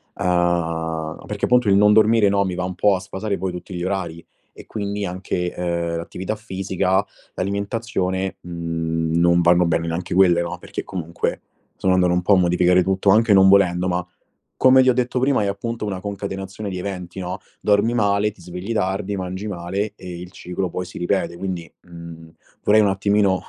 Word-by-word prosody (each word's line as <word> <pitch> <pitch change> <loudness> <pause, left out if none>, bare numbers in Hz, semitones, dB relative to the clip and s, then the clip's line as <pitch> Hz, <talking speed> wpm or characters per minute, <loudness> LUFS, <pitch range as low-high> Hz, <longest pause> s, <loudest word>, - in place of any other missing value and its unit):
uhm, 85 -3 -1
perché - - -2
punto 125 -2 +3
il 100 - +5
non 105 +1 +5
dormire, 110 0 +5
no, 100 0 +2
mi 90 -1 -3
va 90 - -2
un 90 0 -4
po' 100 +2 +3
a - - -3
sfasare 100 +2 -4
poi 95 +1 -3
tutti 90 +1 -8
gli 90 -1 -4
orari 85 -3 -3 0.3
e - - -13
quindi, 100 -1 -3
anche, 90 -1 -3
uhm, 85 -1 -2
l'attività 95 +5 -4
fisica, 95 -2 -1 0.3
l'alimentazione, 100 -2 -2
mhmm, 80 -1 -2
non 85 0 +4
vanno 85 +1 +4
bene 85 0 0
neanche 85 +2 -3
quelle, 90 -2 +5
no, 85 - -4
perché, - - -6
comunque, 85 -3 -3 0.4
sono 95 - +2
andato 90 -1 +3
un 90 - +1
po' 95 +3 +3
a - - +6
modificare 90 0 +3
tutto, 95 +1 +1
anche 110 +3 +5
non 95 -1 +7
volendo, 95 -2 +4
ma 90 -1 -1 0.5
come 130 0 +6
ti 130 - +3
ho 130 - +5
detto 125 +1 0
prima, 135 -3 +2
è - - 0
appunto 110 +4 -3
una 95 -3 -3
concatenazione 100 0 -5
di 90 - -4
eventi, 90 -1 -6
no, 90 +1 -4 0.2
dormi 105 +3 +2
male, 100 -2 +2
ti 100 - -19
svegli 90 +5 -6
tardi, 100 -1 -1
mangi 95 +2 -5
male 100 +3 -3
e 90 -3 -8
il 90 0 -9
ciclo 90 0 -4
poi 90 +2 -4
si 90 - -12
ripete, 90 0 -1
quindi, 90 -3 -5 0.2
mhmm, 85 -1 -11 0.3
vorrei, 110 +1 +5
un 105 - +4
attimino, 100 -1 +2
95 Hz, 190 wpm, -21 LUFS, 90-100 Hz, 0.5 s, non